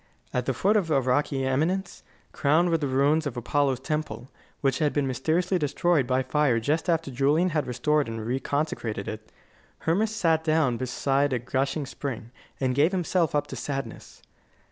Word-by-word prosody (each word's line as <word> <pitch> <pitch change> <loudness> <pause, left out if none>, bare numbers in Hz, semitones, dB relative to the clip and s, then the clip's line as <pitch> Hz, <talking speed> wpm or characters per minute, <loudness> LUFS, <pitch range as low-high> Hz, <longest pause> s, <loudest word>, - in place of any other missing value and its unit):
At 125 -1 -1
the 135 - +1
foot 205 - +3
of 185 -6 0
a 145 -3 +3
rocky 135 +1 0
eminence, 165 +8 -1 0.3
crowned 160 +5 +2
with 165 -1 +1
the 145 - 0
ruins 145 +4 +2
of 125 -3 -5
Apollo's 135 +1 +1
temple, 135 -5 -4 0.3
which 135 -2 +1
had 150 -2 +1
been 145 -2 +1
mysteriously 160 +8 0
destroyed 150 -1 +1
by 130 +1 +1
fire 140 -5 +2
just 150 +9 -1
after 165 -4 0
Julian 145 +8 +2
had 150 -3 -1
restored 150 +3 +1
and 115 0 -5
reconsecrated 125 -4 -2
it, 110 0 -7 0.5
Hermas 195 +7 +1
sat 165 -6 +2
down 155 -6 +2
beside 135 +2 0
a - - +2
gushing 135 +4 -1
spring, 125 -3 -6 0.3
and 130 -2 +1
gave 150 +8 +3
himself 175 -3 +1
up 145 - +1
to - - -8
sadness. 135 -5 -6
145 Hz, 170 wpm, -26 LUFS, 130-160 Hz, 0.5 s, foot